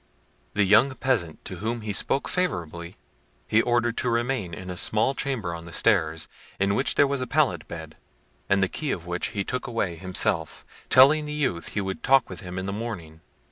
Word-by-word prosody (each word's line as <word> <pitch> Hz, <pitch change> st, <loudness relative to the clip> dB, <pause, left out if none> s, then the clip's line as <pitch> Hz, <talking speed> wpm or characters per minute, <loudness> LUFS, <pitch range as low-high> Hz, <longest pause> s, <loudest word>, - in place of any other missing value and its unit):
The 105 Hz, -, +4 dB
young 110 Hz, +7 st, +5 dB
peasant, 110 Hz, -14 st, -1 dB
to -, -, -6 dB
whom 115 Hz, +2 st, -3 dB
he 105 Hz, -1 st, -4 dB
spoke 135 Hz, +7 st, 0 dB
favourably, 85 Hz, -, -3 dB, 0.5 s
he 110 Hz, -, +3 dB
ordered 120 Hz, -1 st, +1 dB
to 125 Hz, -, +1 dB
remain 120 Hz, -5 st, -1 dB
in 90 Hz, +2 st, -7 dB
a -, -, -5 dB
small 110 Hz, +8 st, +2 dB
chamber 120 Hz, -12 st, -2 dB
on 85 Hz, 0 st, -8 dB
the 85 Hz, -, -10 dB
stairs, 80 Hz, -6 st, +2 dB, 0.3 s
in 100 Hz, +1 st, +2 dB
which 130 Hz, -, +1 dB
there 145 Hz, -, +5 dB
was 140 Hz, -1 st, -1 dB
a 130 Hz, -, -2 dB
pallet -, -, +1 dB
bed, 80 Hz, -2 st, -9 dB, 0.5 s
and 100 Hz, 0 st, +3 dB
the -, -, +3 dB
key 150 Hz, -, -4 dB
of 85 Hz, -, -4 dB
which 90 Hz, 0 st, -2 dB
he 100 Hz, -, -3 dB
took 130 Hz, +5 st, -3 dB
away 105 Hz, -7 st, -2 dB
himself, 90 Hz, -1 st, 0 dB, 0.2 s
telling 145 Hz, +4 st, +6 dB
the 150 Hz, -, -5 dB
youth 130 Hz, -, -2 dB
he -, -, +2 dB
would 95 Hz, +4 st, -4 dB
talk 135 Hz, -5 st, +3 dB
with 90 Hz, -, -6 dB
him 90 Hz, -1 st, -7 dB
in 95 Hz, -, -3 dB
the 100 Hz, -, -3 dB
morning. 90 Hz, -8 st, -6 dB
100 Hz, 205 wpm, -25 LUFS, 85-125 Hz, 0.5 s, telling